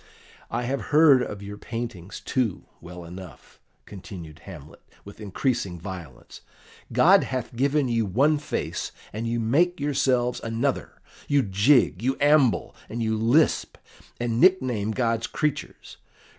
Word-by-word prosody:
"I 120 +2 -2
have 130 +3 -2
heard 150 -4 +6
of 105 -4 -5
your 105 +1 -8
paintings, 110 -6 -6
too, 120 -8 -1 0.2
well 90 0 -10
enough," 90 -2 -12 0.3
continued 85 -5 -10
Hamlet, 75 -6 -12 0.2
with 100 +2 -12
increasing 100 -3 -2
violence. 85 -8 -9 0.5
"God - - +5
hath 130 -2 -4
given 140 +2 +1
you 115 -3 0
one 140 +10 +2
face, 150 - -4 0.2
and 110 +2 -3
you 120 0 -1
make 155 +11 +2
yourselves 130 -4 +1
another; 115 +4 -2 0.3
you 145 -2 +3
jig, 100 0 +3
you 130 +3 0
amble, 145 -4 +3
and 115 +1 -3
you 110 0 0
lisp, 120 +8 +2 0.4
and 120 -1 -1
nickname 130 - +3
God's 115 0 0
creatures. 150 -1 -4
115 Hz, 130 wpm, -25 LUFS, 100-135 Hz, 0.5 s, heard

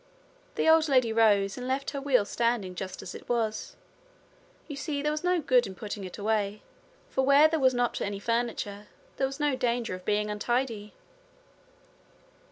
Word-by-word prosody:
The - - 0
old 320 -1 +5
lady 255 -4 +3
rose, 205 -2 +3
and 250 - -5
left 270 +1 -1
her 280 -1 -4
wheel 265 -6 +3
standing 230 -5 -1
just 185 +1 -6
as 180 - -7
it - - -11
was. 225 -3 -1 0.9
You 295 - -6
see 285 0 -3
there 300 - +1
was 305 +2 -3
no 360 0 +2
good 255 -5 +3
in 190 - -8
putting 205 +1 -6
it 185 - -8
away, 210 -1 -1 0.5
for 265 - +1
where 280 +3 +6
there 320 0 -1
was 260 -2 +3
not 245 -1 0
any 200 0 -2
furniture 215 -2 -2 0.3
there 270 - +1
was 270 +2 -8
no 295 -2 +1
danger 240 -4 -1
of 185 0 -7
being 210 +1 0
untidy. 220 -1 -2
240 Hz, 175 wpm, -28 LUFS, 210-275 Hz, 0.9 s, where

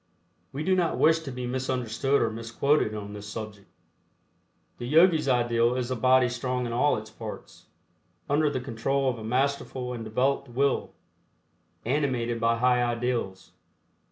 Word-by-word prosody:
We 145 +3 -4
do 190 +2 +2
not 175 -3 +1
wish 160 +1 +4
to 155 -4 -7
be 125 0 -5
misunderstood 130 +1 0
or 110 - 0
misquoted 115 +2 0
on 105 -1 -6
this 105 0 -8
subject. 105 -2 -7 1.1
The 120 - -5
Yogis' 160 +1 +4
ideal 120 -1 +2
is 130 0 -2
a - - 0
body 130 +1 +4
strong 125 0 -2
in 120 - -4
all 145 +5 +2
its 110 0 -8
parts, 110 0 -9 0.6
under 150 +1 +2
the 130 -3 -3
control 135 +2 0
of 120 - -8
a - - -8
masterful 130 +1 -1
and 115 -2 -6
developed 125 +5 0
Will, 135 +3 0 0.9
animated 125 -3 0
by 115 0 +2
high 125 0 +3
ideals. 120 -5 -2
125 Hz, 155 wpm, -27 LUFS, 115-135 Hz, 1.1 s, wish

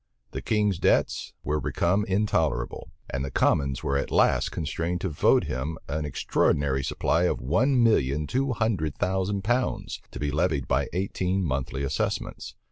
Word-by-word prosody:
The - - -5
king's 105 -4 +1
debts - - +1
were 75 +2 0
become 95 +8 +1
intolerable; 95 - 0 0.2
and 65 +1 -2
the 70 - -3
commons 70 0 +1
were 70 0 +1
at - - -3
last - - +3
constrained 85 +4 -2
to 95 - -1
vote 75 - +3
him 75 +6 -3
an 75 +1 -2
extraordinary 70 -1 +1
supply 70 - +1
of - - 0
one 120 - +2
million 75 - +2
two 130 - 0
hundred 100 - -1
thousand 95 +1 -1
pounds, 120 +4 -1
to - - -8
be 75 -1 -1
levied 75 -3 0
by - - +1
eighteen 95 +1 -1
monthly 70 -2 -2
assessments. 70 - -3
80 Hz, 155 wpm, -26 LUFS, 70-100 Hz, 0.2 s, last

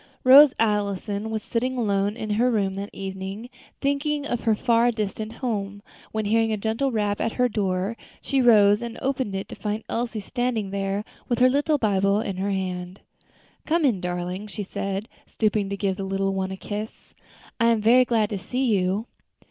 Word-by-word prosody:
Rose 275 +2 +9
Allison 205 -1 0
was 220 -1 -3
sitting 255 +2 -2
alone 205 -2 0
in 215 - -4
her 235 +4 +2
room 200 -5 0
that 200 +1 -5
evening, 195 +4 -6 0.3
thinking 285 +1 0
of 245 -5 -2
her 225 -2 +2
far 235 +1 +3
distant 215 -1 -3
home, 205 -5 -4 0.3
when 220 -1 -2
hearing 225 +1 +2
a 215 - 0
gentle 225 +6 -1
rap 205 -3 -1
at 225 - -1
her 250 0 +2
door, 195 -1 -1 0.2
she 275 -1 0
rose 210 -3 +6
and 235 -1 -6
opened 260 -7 -2
it 195 - -4
to - - -7
find 210 +1 -3
Elsie 230 -2 -2
standing 230 -2 -2
there 195 +1 -2 0.2
with 240 - +1
her 255 +2 +5
little 290 +3 +2
Bible 200 -3 +2
in 195 -4 -3
her 195 +2 -1
hand. 185 -1 -4 0.7
"Come 325 0 +2
in, 220 -9 +2
darling," 180 +3 -4
she 205 0 -5
said, 195 +2 -4 0.2
stooping 210 -2 0
to 200 - -3
give 195 -2 -1
the 195 - -4
little 195 0 -1
one 190 0 -2
a 190 - -6
kiss; 210 +2 -7 0.5
"I 230 - +4
am 230 -1 +3
very 235 +4 +5
glad 225 -4 +1
to 200 - -2
see 255 +7 -2
you." 190 +3 0
210 Hz, 190 wpm, -24 LUFS, 195-235 Hz, 0.7 s, Rose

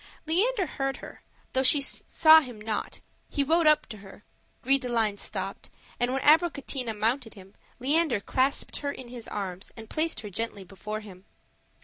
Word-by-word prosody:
Leander 385 +6 +2
heard 270 -2 -3
her, - - -11 0.3
though 260 - +2
she 265 +3 +5
saw 315 +3 +5
him 245 -6 -9
not: 215 0 -4 0.3
he 285 - 0
rode 325 +3 +3
up 305 0 +5
to 220 - -9
her; 195 0 -14 0.4
Gris 275 +2 +3
de 250 -2 -5
line 220 -4 0
stopped, - - -4 0.3
and 245 +1 +1
when 265 0 -1
Abricotina 280 -7 +2
mounted 230 +2 -1
him, 195 0 -14 0.3
Leander 285 -1 +2
clasped 260 +6 -1
her 285 -1 -3
in 260 -3 -9
his 240 -2 -8
arms 190 -2 -5
and 225 -1 -11
placed 315 -7 0
her 210 -2 -8
gently 210 0 -3
before 210 +3 -6
him. 190 -3 -13
250 Hz, 170 wpm, -27 LUFS, 215-285 Hz, 0.4 s, she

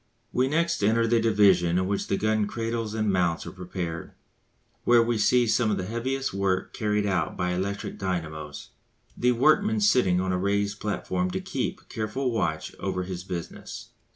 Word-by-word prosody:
We 130 +1 +2
next 170 -2 0
enter 115 +3 +3
the 115 0 +3
division 95 -6 +4
in 95 - +1
which 100 +1 -1
the 100 - 0
gun 110 -1 +1
cradles 115 0 -3
and 110 -2 +1
mounts 85 -3 +1
are 85 - -6
prepared, 90 -2 -5 0.7
where 120 -1 +5
we 115 -1 0
see 120 +3 +4
some 115 0 +2
of 105 - +1
the 95 - -3
heaviest 130 +5 -2
work 95 -1 0
carried 105 -1 0
out 90 -6 -1
by 90 0 0
electric 100 +3 -3
dynamos, 80 -6 -4 0.5
the 125 +1 +2
workman 200 - +3
sitting 125 - +3
on 95 0 0
a 90 - 0
raised 100 +1 0
platform 90 -2 -1
to - - -2
keep - - -4
careful 115 +4 -2
watch 80 -9 -1
over 90 - -2
his 90 -1 -5
business. 90 -3 -7
100 Hz, 175 wpm, -26 LUFS, 90-115 Hz, 0.7 s, where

